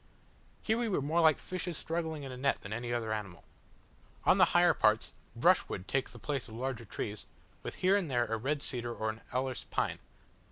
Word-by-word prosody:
Here 220 +1 +1
we 235 -2 0
were 190 - +1
more 155 +5 +2
like 160 -2 +6
fishes 180 -3 -4
struggling 160 -2 -3
in 135 - -6
a - - -6
net 135 +2 +1
than 100 - -6
any 120 +2 -3
other 115 -2 -1
animal. 100 -5 -5 0.8
On - - +5
the - - +9
higher - - +6
parts, - - +2 0.2
brushwood 90 - +2
takes 135 -1 0
the 120 - -11
place 135 +3 -3
of 110 - -10
larger 120 -1 -3
trees, 105 +2 -5 0.3
with - - -6
here 185 +2 +3
and 190 -6 0
there 120 -2 +2
a 115 - -1
red 140 +6 -1
cedar 120 -2 -2
or 110 0 -1
an 110 - -12
alerce 130 0 -2
pine. - - 0
130 Hz, 205 wpm, -32 LUFS, 115-160 Hz, 0.8 s, the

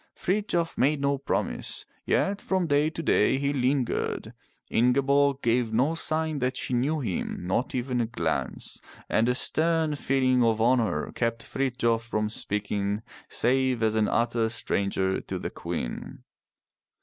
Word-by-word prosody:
Frithjof 180 -4 -1
made 145 +3 +3
no 140 0 +1
promise, - - -2 0.2
yet 200 +1 +1
from 190 -2 0
day 145 0 +2
to 165 +1 -6
day 135 - +3
he 140 +1 0
lingered. 130 -1 -1 0.4
Ingeborg 140 +3 +3
gave 115 -1 +2
no 130 +8 +2
sign 160 -2 -1
that 130 0 -1
she - - -2
knew 140 +6 +1
him, 95 -5 -3
not 105 +9 -1
even 125 -1 0
a 115 - 0
glance, 85 -9 -3 0.3
and 115 +2 +2
a 125 - +2
stern 160 +2 +2
feeling 130 -3 +2
of 115 -1 +2
honor 120 0 +2
kept 115 -1 -2
Frithjof 120 -4 0
from 105 -2 -2
speaking 105 0 -1 0.3
save 130 -1 +2
as 110 -1 +2
an 110 -1 +2
utter 115 -1 +1
stranger 95 -3 0
to - - -5
the - - -5
Queen. - - -5
125 Hz, 145 wpm, -27 LUFS, 115-140 Hz, 0.4 s, made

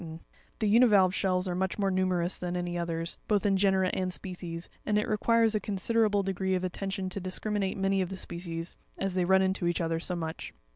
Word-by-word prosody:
93 160 0 -9 0.3
The 220 - 0
univalve 205 -4 +5
shells 185 -1 0
are 180 - -1
much 190 +1 -1
more 195 -2 +1
numerous 185 -1 0
than 180 0 -3
any 175 0 -3
others, 165 -1 -2
both 205 -2 +1
in 200 -1 +3
genera 190 -1 +3
and 185 -1 -1
species; 175 -2 -5 0.2
and 210 0 +1
it 210 - 0
requires 225 +1 +3
a 215 - +2
considerable 205 +1 +1
de 195 0 -1
gree 190 0 0
of 185 - -2
attention 190 +1 -3
to 190 - -3
discriminate 195 +2 -2
many 195 0 +1
of 180 - -2
the 190 - -6
species, 170 -2 -6 0.2
as 195 -1 -2
they 180 -1 +1
run 190 +1 +4
into 190 -2 0
each 175 - 0
other 165 -1 0
so 180 +2 -3
much. 160 -2 -5
190 Hz, 215 wpm, -29 LUFS, 175-200 Hz, 0.3 s, univalve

